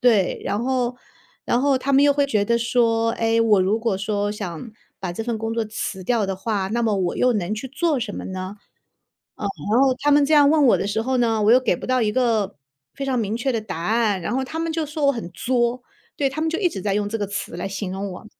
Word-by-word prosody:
对， 220 -7 +3
然 210 +3 -1
后 250 -1 0 0.5
然 240 - +2
后 280 -1 +3
他 270 +2 -3
们 280 +2 +6
又 285 - +5
会 285 0 +2
觉 215 -7 +1
得 235 +3 +2
说， 230 -1 +2
哎， 225 0 +1
我 215 -4 +4
如 205 +4 +1
果 225 -4 0
说 205 0 -1
想 205 +1 -6 0.3
把 185 -2 -3
这 220 +5 -5
份 235 -2 -2
工 225 +1 -3
作 230 - 0
辞 210 -3 -5
掉 230 -2 +1
的 195 -1 -3
话， 200 -1 -2
那 235 +3 -1
么 220 -2 +2
我 180 -2 -1
又 250 - +3
能 205 -3 -2
去 220 +5 -5
做 300 +1 0
什 225 -4 -4
么 - - -6
呢？ 185 +1 -5 0.8
呃， 205 - -4 0.2
然 235 +4 +4
后 265 -1 +4
他 290 - +2
们 290 0 +5
这 310 - +3
样 290 -1 +6
问 300 -3 +4
我 - - +5
的 - - -2
时 205 +2 -1
候 260 +2 0
呢， 225 -2 +2
我 215 - +6
又 255 - +6
给 230 -8 +1
不 - - -8
到 255 -1 +2
一 210 - +1
个 220 -7 +1 0.4
非 275 - -4
常 260 -2 0
明 215 0 -1
确 265 +2 -1
的 225 - -1
答 210 -6 -6
案， 215 +1 +1
然 210 - -2
后 265 - 0
他 315 +5 -6
们 330 -1 -2
就 320 -1 -1
说 295 -1 -1
我 280 - +5
很 220 -8 -6
作。 245 +3 0 0.3
对， 280 - +1
他 295 - -5
们 320 0 0
就 330 - -2
一 370 -4 +2
直 195 - -7
在 200 0 0
用 205 0 0
这 225 - -2
个 205 - -2
词 205 -4 -5
来 185 +2 -4
形 195 -1 -4
容 195 0 -4
我。 185 - -10
230 Hz, 285 characters per minute, -22 LUFS, 205-260 Hz, 0.8 s, 们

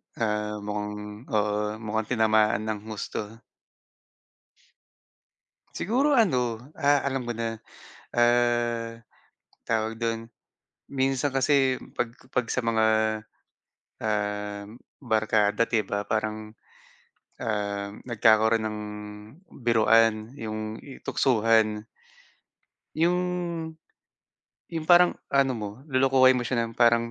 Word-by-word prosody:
Ah, 105 -1 -1
mukhang 105 +2 -5
oo, 105 0 0
mukhang 110 0 -2
tinamaan 110 -2 +3
nang 110 -1 -2
husto. 110 +1 -6 2.3
Siguro 270 - +2
ano, 125 - +1
ah, 145 -1 +3
alam 135 -3 -2
ko 120 - -1
na, 115 -1 -3 0.6
ah, 120 -1 +2 0.7
tawag 110 -1 0
dun, 115 0 -1 0.7
minsan 135 0 0
kasi 135 -1 +3 0.2
'pag 120 -1 0 0.2
'pag 125 -2 0
sa 125 - 0
mga, 115 -1 +2 1.2
ah, 105 -1 -2 0.4
barkada, 110 -2 +2
di 115 -2 +1
ba, 100 +1 -3
parang, 110 0 -2 0.9
um, 100 -3 -2 0.2
nagkakaroon 110 -1 +4
ng 105 0 -5 0.9
biruan 115 -1 +3
yung 110 -2 -5
i 135 - -11
tuksuhan. 110 -3 +2 1.2
Yung 175 +3 +2 1.5
yung 160 -2 -4
parang 175 0 +7 0.2
ano 140 -1 +3
mo, 105 -1 -4 0.2
lolokohin 130 0 +5
mo 125 - -3
siya 120 -1 0
ng 115 - -7
parang, 115 -1 +4
115 Hz, 95 wpm, -26 LUFS, 110-125 Hz, 2.3 s, parang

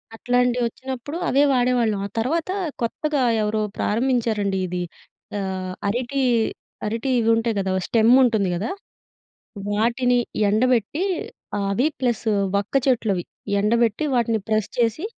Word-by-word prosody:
అట్లాంటివొచ్చినప్పుడు 245 +4 -1
అవే 275 +2 +4
వాడేవాళ్ళం. 245 -4 +2
ఆ - - -17
తర్వాత 320 +9 -1 0.3
కొత్తగా 290 +4 -1 0.2
ఎవరో 215 0 0 0.2
ప్రారంభించారండి 220 -4 0
ఇది. 180 0 -3 0.6
ఆహ్, 185 -1 -3 0.2
అరిటి 250 +5 -1 0.7
అరిటి 230 +5 -2
ఇవి 225 - +1
ఉంటయి 225 -1 0
గదా! 190 -1 -1
ఓ - - +1
స్టెమ్ 225 0 +4
ఉంటుంది 220 -6 +2
గదా! 200 +7 -2 1.0
వాటిని 240 +4 +2 0.3
ఎండబెట్టి 250 - +1 0.7
అవి 245 +9 +2
ప్లస్ 240 -2 0 0.3
వక్క 205 +6 -4
చెట్లు 235 -5 +2
అవి, 175 - -3 0.4
ఎండబెట్టి 230 +3 +2
వాటిని 230 -2 +1
ప్రెస్ 215 -1 +1
చేసి, 235 - +1
230 Hz, 120 wpm, -23 LUFS, 210-250 Hz, 1.0 s, అవే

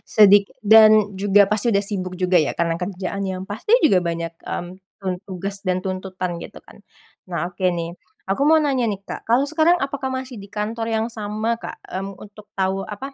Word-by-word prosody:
sedik 205 -1 +7 0.2
dan 215 -1 +7
juga 200 +1 +4
pasti 215 +4 +1
udah 200 -2 +2
sibuk 185 -3 -4
juga 185 0 +1
ya, 150 - -1
karena 170 -1 +1
kerjaannya 190 0 -4
pasti 220 - +2
juga 185 -9 +4
banyak, 170 -1 -3
mmm, 185 +1 -6
tugas 195 +2 -3
dan 185 -2 0
tuntutan 185 -2 -4
gitu - - -10
kan. - - -17 0.5
Nah 170 -1 -2
oke 185 - -9
nih, 170 -1 -3 0.3
aku 195 +8 -2
mau 320 - +6
nanya 265 -6 +1
nih 200 -2 -3
Kak, - - -6
kalau 255 +4 +4
sekarang 315 +3 +3
apakah 275 -1 -3
masih 260 -4 -5
di 200 - -12
kantor 225 +2 -3
yang 220 +1 0
sama 215 +2 -2
Kak, - - -7
mmm, 195 +1 -6
untuk 210 0 -14
tahu 190 0 0
apa, 265 +8 -7
200 Hz, 185 wpm, -21 LUFS, 185-220 Hz, 0.5 s, sedik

